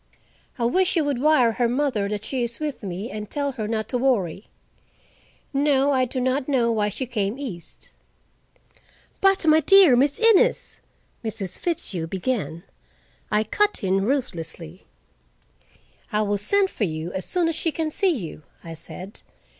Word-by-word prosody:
I 235 - 0
wish 370 +10 +2
you 330 - +3
would 280 -4 -1
wire 295 -6 +4
her 235 +1 0
mother 245 -6 0
that 210 0 -4
she 260 +2 -2
is 235 -1 -2
with 300 -3 -4
me, 195 +2 -5
and 210 -1 -6
tell 285 -1 -1
her 225 -5 -4
not 220 -1 -2
to 250 - -1
worry. 210 -8 0 1.1
No, 280 0 +3
I 260 -2 +2
do 255 +1 -4
not 260 +2 0
know 245 -5 +2
why 210 -2 +1
she 260 +6 -4
came 220 -2 -2
east." 220 -12 -8 1.3
"But 390 -2 +3
my 310 0 +6
dear 355 -3 +7
Miss 280 +3 +2
Innes!" 455 +1 +3 0.4
Mrs. 205 -5 -4
Fitzhugh 195 - -2
began. 190 -3 -3 0.7
I 210 0 +2
cut 415 - 0
in 195 0 +1
ruthlessly. 175 - -4 1.2
"I 210 0 +1
will 205 -1 0
send 390 - +2
for 215 - -1
you 160 0 -4
as 190 -1 -3
soon 355 -2 +1
as 330 - 0
she 330 - -1
can 315 0 -2
see 390 +4 +2
you," 190 - -4 0.2
I 165 - -8
said. 180 +5 -6
240 Hz, 160 wpm, -24 LUFS, 200-290 Hz, 1.3 s, dear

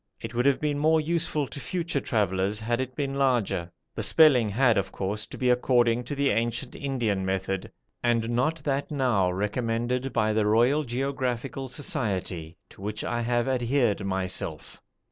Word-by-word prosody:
It - - -7
would 120 +3 +2
have 140 - +3
been 145 -1 -1
more 160 +2 +4
useful 155 -2 0
to 145 - -8
future 170 -4 -2
travellers 100 -2 0
had 120 +3 -1
it 130 -1 -5
been 140 -1 -2
larger. 115 -10 +1 0.2
The - - -4
spelling 135 -9 +5
had, 120 +2 +3
of 100 -2 -1
course, 100 +2 -3
to - - -9
be 125 -1 +2
according 120 -1 +2
to 145 - -4
the 140 0 +2
ancient 120 +3 -1
Indian 120 -9 -1
method, 95 0 -2 0.3
and 115 -1 +1
not 125 +7 +1
that 140 -1 -1
now 125 - +1
recommended 115 +6 -1
by 110 0 +1
the 105 -1 +2
Royal 120 +8 +3
Geographical 130 0 -3
Society, 95 - -3
to - - -15
which 105 +1 -4
I 120 0 -1
have 120 +1 0
adhered 120 -4 +1
myself. 95 -1 -4
120 Hz, 165 wpm, -27 LUFS, 105-135 Hz, 0.3 s, spelling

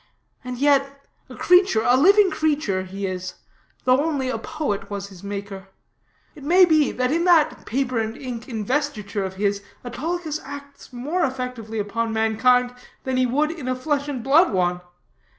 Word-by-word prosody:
And 250 0 -6
yet, 275 0 +1 0.2
a - - -10
creature, 360 - +4
a 245 - +5
living 390 +7 +5
creature, 290 -12 0
he 195 +1 -6
is, 185 -1 -5 0.5
though 255 +3 +3
only 285 -5 -1
a - - -2
poet 285 -12 -4
was 200 -1 -5
his 190 -2 -14
maker. 200 -1 -6 0.7
It 295 - -14
may 360 +5 +6
be, 310 -4 +3
that 255 +1 -1
in 335 +2 +1
that 320 -4 +3
paper 255 0 -1
and 220 +1 -3
ink 250 -2 -7
investiture 220 -3 -2
of 190 0 -5
his, 200 0 -1 0.2
Autolycus 310 +5 -3
acts 280 +1 -11
more 295 +9 -2
effectively 250 -5 -4
upon 225 +2 -2
mankind 245 +3 +2 0.3
than 260 -1 -2
he 255 0 +2
would 295 +5 +1
in 315 -6 -7
a 255 - 0
flesh 285 +2 -1
and 265 -5 -4
blood 310 +8 +4
one. 180 -2 0
255 Hz, 170 wpm, -23 LUFS, 215-295 Hz, 0.7 s, may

